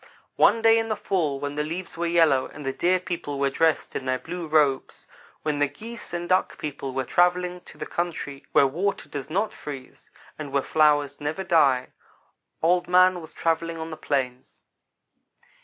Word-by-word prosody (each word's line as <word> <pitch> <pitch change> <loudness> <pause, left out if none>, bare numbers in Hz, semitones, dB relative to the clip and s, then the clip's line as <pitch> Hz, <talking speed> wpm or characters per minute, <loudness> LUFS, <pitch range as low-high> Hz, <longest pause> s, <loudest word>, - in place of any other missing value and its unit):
"One 230 - +4
day 225 0 +6
in 225 - -2
the 215 - -1
fall 155 -9 -1
when 145 0 -3
the 150 +1 -1
leaves 170 +4 -5
were 170 +1 -1
yellow, 165 -6 +3
and 150 - -10
the 135 - -1
Deer 180 +6 +2
people 170 -5 -4
were 140 0 +1
dressed 160 +2 +1
in 130 - -3
their 130 0 +1
blue 170 +4 -6
robes 150 -3 +1 0.4
when 150 -2 -1
the 145 - +3
Geese 220 +11 -9
and 175 0 -3
Duck 185 +1 +1
people 140 -2 -5
were 135 - 0
travelling 180 +4 +1
to - - -14
the - - -5
country 160 -5 -4
where - - +5
water 180 +9 -1
does 140 -1 -6
not 200 +6 0
freeze, 135 -3 -9 0.3
and 145 -3 -6
where 140 -1 +1
flowers 145 -2 +2
never 155 +6 -2
die, 140 -8 +3 0.7
Old 175 +2 +3
man 180 0 +5
was 160 - -10
travelling 165 0 -1
on 160 0 -6
the - - -5
plains. 130 -4 -3
160 Hz, 185 wpm, -25 LUFS, 140-180 Hz, 0.7 s, day